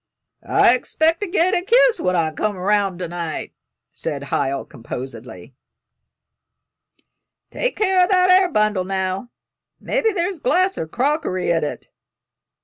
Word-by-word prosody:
"I 240 - +4
'xpect 325 +5 +1
to 415 - -3
get 360 0 +1
a - - +2
kiss 470 +2 +4
when 180 - 0
I 165 -2 +1
come 205 +6 -2
'round 195 0 0
to 180 -1 -4
night," 170 -2 -5 0.4
said 140 -3 -5
Hiel, 135 0 -1
composedly. 115 -3 -9 2.0
"Take - - -2
care 380 -3 +3
o' - - +2
that 365 -1 +4
air 370 0 +5
bundle, 215 - +1
now; 190 +3 -3 0.5
mebbe 450 -4 0
there's 355 0 -2
glass 370 +5 +1
or 160 - -3
crockery 250 - -1
in't." 160 -3 -2
210 Hz, 135 wpm, -20 LUFS, -, 2.0 s, air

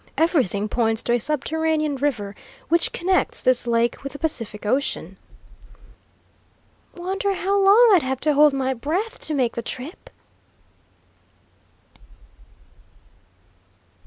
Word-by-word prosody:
Everything 255 - +1
points 225 0 0
to 240 - 0
a 240 - +2
subterranean 310 +2 0
river 245 -8 -2 0.4
which 335 +1 +2
connects 370 +2 0
this 255 -1 +1
lake 235 0 0
with 275 -1 -6
the - - -7
Pacific 230 -10 -3
Ocean." 265 +7 -1 1.8
"Wonder 385 +3 -2
how 390 +2 -1
long 435 +4 +6
I'd 365 - +5
have 260 -1 -3
to 305 -1 +2
hold 295 +1 +5
my 265 -1 -1
breath 360 - -3
to 310 - -2
make 250 -4 0
the 235 - -4
trip?" 260 - -8
285 Hz, 115 wpm, -22 LUFS, 240-335 Hz, 1.8 s, long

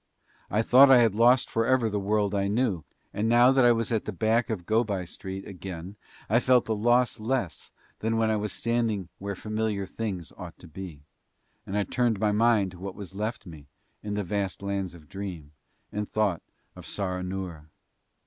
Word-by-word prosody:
I 105 +3 +1
thought 135 +4 +7
I 135 - +8
had 115 -4 +4
lost 120 +4 +4
forever 115 +1 +2
the 105 -1 -1
world 105 0 0
I 100 -1 +1
knew, 105 - 0 0.3
and 110 +2 0
now 120 +2 +6
that 135 -1 +4
I 120 - +7
was 115 0 0
at 110 -2 0
the - - -3
back 110 +5 +1
of 100 -6 -3
Go 110 +4 +3
by 100 -5 -3
Street 95 +2 -7
again 95 0 -7 0.3
I 115 - +4
felt 125 -1 +4
the 110 - -1
loss 120 +3 +2
less 110 - -2 0.3
than 115 +1 0
when 110 -1 +2
I - - +2
was 105 -1 -2
standing 115 -6 -1
where 100 0 -4
familiar 110 0 -2
things 95 -4 -5
ought 90 -2 -9
to 90 - -13
be; 80 -3 -9 0.6
and 100 - -2
I 105 - +2
turned 120 -1 0
my 105 0 +2
mind 105 -3 +3
to 90 - -13
what 95 +1 -6
was 100 -2 -9
left 110 +4 -4
me 80 -5 -11 0.3
in 105 -1 -4
the 105 - -1
vast 100 +1 -3
Lands 100 -3 -3
of 80 -3 -15
Dream 90 -4 -7 0.4
and 105 0 -3
thought 105 -6 +1 0.3
of - - -10
Saranoora. 90 -4 -4
105 Hz, 195 wpm, -27 LUFS, 95-115 Hz, 0.6 s, I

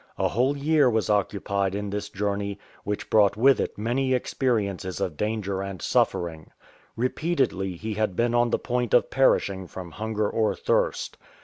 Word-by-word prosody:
A - - +1
whole 130 +6 +1
year 145 -1 +3
was 110 -2 +1
occupied 100 -1 0
in 100 -1 -3
this 105 0 -3
journey, 100 0 -2 0.3
which 105 0 -3
brought 100 -2 +4
with 135 +4 +5
it - - -2
many 130 +5 +1
experiences 100 -8 -1
of 95 -5 -2
danger 100 0 -2
and 100 -2 -5
suffering. 80 -2 0 0.5
Repeatedly 125 - 0
he 110 +5 -4
had 105 -3 -1
been 120 +2 +1
on 120 0 +3
the - - +1
point 125 -1 0
of 125 - +3
perishing 100 -8 +2
from 90 -2 -8
hunger 110 +3 -2
or 110 0 0
thirst. - - -1
105 Hz, 165 wpm, -25 LUFS, 100-120 Hz, 0.5 s, with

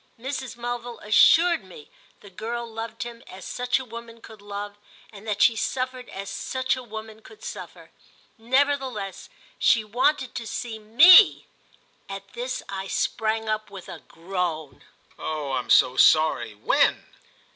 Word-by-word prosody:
Mrs. 260 0 -5
Mulville 240 0 -5
assured 325 - +5
me 180 -6 -14 0.3
the 200 - -14
girl 230 +5 -5
loved 225 +1 -6
him 235 -1 -9
as 190 0 -11
such 250 0 -1
a 260 - -6
woman 230 0 -10
could 220 -2 -14
love 205 0 -7 0.3
and 210 +1 -12
that 205 -2 +1
she 230 - +5
suffered 255 +2 -3
as 195 +1 -7
such 260 +5 -2
a 255 - -7
woman 220 -2 -9
could 430 - -16
suffer. 485 - -9 0.4
Nevertheless 260 -4 -1 0.3
she 225 - +4
wanted 255 +4 0
to 230 - -6
see 225 -1 -5
me. 310 - +7 0.6
At - - -8
this - - -4
I 195 0 -5
sprang 220 +2 -1
up 215 0 -2
with 195 -3 -11
a - - -8
groan. 165 -4 -5 0.4
"Oh 150 -3 -4
I'm 125 -2 -3
so 125 - +5
sorry!—when?" 120 -10 +3
225 Hz, 145 wpm, -25 LUFS, 200-250 Hz, 0.6 s, me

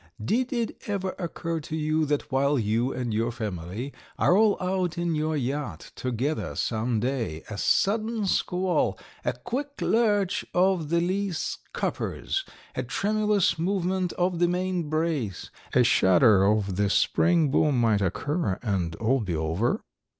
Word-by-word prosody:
Did 235 - 0
it 235 -3 -2
ever 190 -2 -1
occur 165 -2 -3
to 155 +1 -6
you 155 0 +1
that 145 0 -1
while 140 +2 +2
you 115 +3 +1
and 125 -3 -3
your 115 +2 0
family 105 +3 -5 0.2
are 180 - +4
all 210 0 +4
out 180 -2 -1
in 170 -1 0
your 155 0 0
yacht 140 +2 -3
together 130 +5 -2
some 115 0 0
day, 115 - -2
a 105 - -4
sudden 215 +1 +1
squall, 180 - +1 0.3
a 120 - +1
quick 270 - -5
lurch 205 -4 +2
of 180 -4 +2
the 170 +1 +3
lee 195 +3 0
scuppers, 390 - -3 0.3
a - - -2
tremulous 210 -4 +1
movement 185 0 0
of 180 -1 0
the 175 - +4
main 180 -2 -1
brace, 155 - -2 0.2
a 125 - +5
shudder 95 -1 +5
of 100 -2 +1
the 100 -1 +2
spring 165 - +3
boom 145 -3 +3
might 110 -3 +3
occur 145 - -1
and 90 -7 -1
all 120 +7 +1
be 95 -7 -2
over?" 80 +9 0
150 Hz, 150 wpm, -26 LUFS, 115-185 Hz, 0.3 s, a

